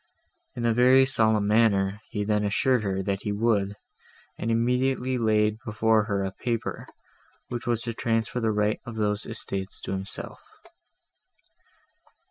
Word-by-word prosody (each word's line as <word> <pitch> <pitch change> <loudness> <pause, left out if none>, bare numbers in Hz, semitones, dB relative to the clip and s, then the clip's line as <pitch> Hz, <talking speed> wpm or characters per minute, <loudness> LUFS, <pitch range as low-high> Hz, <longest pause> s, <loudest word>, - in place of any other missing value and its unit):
In 120 - -3
a 115 - +3
very 130 +3 +6
solemn 110 -5 +2
manner 105 -2 +2
he 105 -2 -2
then 105 0 +1
assured 115 +4 +2
her, 95 -2 -2
that 100 0 -2
he 105 - -3
would, 105 -2 +1 0.6
and 115 - -3
immediately 125 +2 +1
laid 110 -1 +2
before 110 -2 +2
her 100 -2 -1
a 95 - -2
paper, 115 +3 -3 0.6
which 120 0 -5
was 115 -1 0
to 115 - -3
transfer 115 +1 -1
the 115 -2 +1
right 105 0 +1
of 120 - -8
those 105 -1 -1
estates 100 -3 -5
to - - -5
himself. 95 0 -6
110 Hz, 145 wpm, -26 LUFS, 105-115 Hz, 0.6 s, very